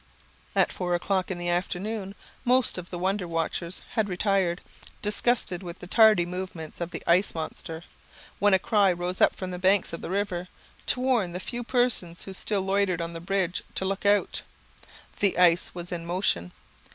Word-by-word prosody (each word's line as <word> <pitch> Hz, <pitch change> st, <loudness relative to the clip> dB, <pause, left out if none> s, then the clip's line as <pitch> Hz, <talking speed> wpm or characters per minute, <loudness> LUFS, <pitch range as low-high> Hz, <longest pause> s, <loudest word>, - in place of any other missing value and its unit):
At -, -, +4 dB
four 180 Hz, -1 st, -1 dB
o'clock 185 Hz, +1 st, 0 dB
in 185 Hz, -, -3 dB
the 175 Hz, 0 st, -2 dB
afternoon 195 Hz, +3 st, -2 dB, 0.3 s
most 250 Hz, -5 st, +2 dB
of 180 Hz, -, -9 dB
the 175 Hz, -, -5 dB
wonder 190 Hz, +1 st, -1 dB
watchers 170 Hz, +2 st, -2 dB
had 220 Hz, -4 st, 0 dB
retired, 185 Hz, -1 st, +1 dB, 0.4 s
disgusted 210 Hz, -3 st, +1 dB
with 175 Hz, -1 st, -7 dB
the -, -, -10 dB
tardy 215 Hz, -2 st, +5 dB
movements 175 Hz, -3 st, -6 dB
of 170 Hz, -, -2 dB
the -, -, -7 dB
ice 180 Hz, +3 st, +3 dB
monster, 160 Hz, 0 st, -5 dB, 0.6 s
when 205 Hz, -1 st, +5 dB
a -, -, +6 dB
cry 200 Hz, 0 st, +3 dB
arose 175 Hz, +1 st, -3 dB
from 185 Hz, -1 st, -5 dB
the 180 Hz, -, -5 dB
banks 190 Hz, 0 st, +3 dB
of 165 Hz, -, -5 dB
the -, -, -5 dB
river, 185 Hz, -2 st, -1 dB, 0.4 s
to -, -, +2 dB
warn 240 Hz, -9 st, +1 dB
the 180 Hz, -, -3 dB
few 240 Hz, +5 st, -4 dB
persons 240 Hz, -9 st, 0 dB
who 195 Hz, -, -7 dB
still 195 Hz, +1 st, 0 dB
loitered 190 Hz, -2 st, +1 dB
on 170 Hz, 0 st, -3 dB
the 165 Hz, -, -6 dB
bridge, 185 Hz, -1 st, -1 dB
to 190 Hz, -, 0 dB
look 195 Hz, +1 st, -2 dB
out. 205 Hz, 0 st, +3 dB, 0.8 s
The 200 Hz, -2 st, +2 dB
ice 175 Hz, -1 st, +4 dB
was 175 Hz, 0 st, -6 dB
in 170 Hz, -1 st, -4 dB
motion. 170 Hz, -, 0 dB
185 Hz, 180 wpm, -27 LUFS, 175-200 Hz, 0.8 s, a